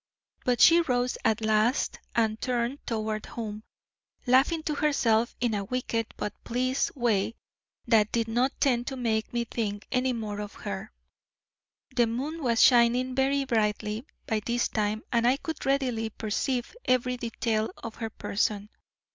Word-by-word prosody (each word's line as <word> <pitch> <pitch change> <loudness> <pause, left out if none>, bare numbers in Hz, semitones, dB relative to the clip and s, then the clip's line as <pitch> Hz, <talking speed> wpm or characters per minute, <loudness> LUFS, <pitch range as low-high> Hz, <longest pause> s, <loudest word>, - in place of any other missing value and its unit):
But 245 -2 +2
she 335 +6 +8
rose 250 -5 0
at 225 -2 +2
last 220 +4 +2 0.2
and 220 -1 +1
turned 250 +2 -1
toward 215 -2 -2
home, 215 -2 -5 0.6
laughing 275 +6 +3
to 305 - -1
herself 240 -6 +2
in 240 -2 +1
a 205 -1 -1
wicked 230 0 -2
but 210 -1 -3
pleased 255 +3 0
way 230 -4 +1 0.5
that 220 -3 +3
did 230 -1 0
not 245 +4 0
tend 245 -3 +2
to 265 - -4
make 220 -3 -1
me 235 -1 -1
think 210 -3 -3
any 255 0 +1
more 215 -4 -4
of 205 0 -7
her. 200 +1 -6 1.0
The 240 -1 +4
moon 280 +8 -3
was 235 -4 +3
shining 245 +1 +5
very 275 +1 +1
brightly 215 0 -1 0.2
by 220 - 0
this 240 +2 0
time 215 0 -1
and 235 0 +3
I 260 +2 +4
could 320 -1 -5
readily 250 -5 +1
perceive 240 - -2
every 250 0 +2
detail 230 -2 -1
of 230 - -7
her 225 -1 -3
person. 210 0 -2
235 Hz, 155 wpm, -28 LUFS, 220-255 Hz, 1.0 s, she